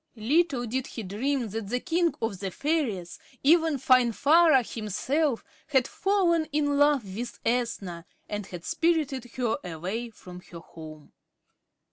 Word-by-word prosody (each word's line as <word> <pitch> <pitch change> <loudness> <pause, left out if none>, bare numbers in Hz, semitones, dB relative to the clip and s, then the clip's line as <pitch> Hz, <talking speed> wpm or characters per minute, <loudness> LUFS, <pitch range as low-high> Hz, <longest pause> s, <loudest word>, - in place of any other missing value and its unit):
Little 265 +3 +1
did 255 +3 -2
he 225 - -7
dream 235 +5 -2
that 220 0 -5
the 250 +2 0
king 340 +2 0
of 215 -5 -2
the 195 - -3
fairies, 230 - -2 0.2
even 320 0 +4
Finvarra 265 +4 +4
himself, 235 - -1 0.2
had 265 -4 +2
fallen 360 -5 +1
in 290 -1 0
love 290 -5 +4
with 235 +2 -6
Ethna, 205 -8 -2 0.2
and 210 -2 -4
had 175 -2 -9
spirited 305 -7 0
her 240 -3 0
away 185 +8 -4
from 180 -5 -12
her 170 - -9
home. 155 -2 -12
245 Hz, 135 wpm, -27 LUFS, 205-295 Hz, 0.2 s, even